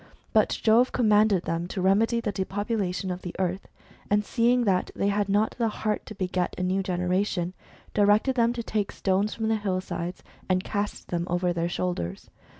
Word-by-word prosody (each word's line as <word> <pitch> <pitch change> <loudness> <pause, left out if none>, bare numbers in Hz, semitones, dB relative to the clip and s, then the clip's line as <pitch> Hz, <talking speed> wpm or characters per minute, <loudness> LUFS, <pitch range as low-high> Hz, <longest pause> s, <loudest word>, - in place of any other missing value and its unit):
But - - +3
Jove 230 +3 +5
commanded 210 -5 +3
them 165 +1 -2
to 190 - -5
remedy 210 +5 +3
the 220 -3 -2
depopulation 195 -1 -2
of 180 0 -5
the 180 - -7
earth, 185 +1 -2 0.4
and 205 0 +2
seeing 245 +2 +2
that 190 -4 +1
they 200 - +1
had 205 0 0
not 205 +2 +2
the 230 - +2
heart 215 -1 -2
to 215 - -8
beget 185 -2 -1
a - - -1
new 185 +2 +1
generation, 180 0 -1 0.4
directed 210 +5 +4
them 235 -2 +3
to 235 -1 -4
take 210 -2 -1
stones 195 +2 0
from 225 -1 -2
the 220 0 +2
hill 195 -3 -1
sides, 175 -1 -5 0.3
and 185 0 +2
cast 205 -1 -3
them 175 0 -2
over 175 0 +1
their 170 0 -1
shoulders. 135 - -3
195 Hz, 185 wpm, -26 LUFS, 180-215 Hz, 0.4 s, Jove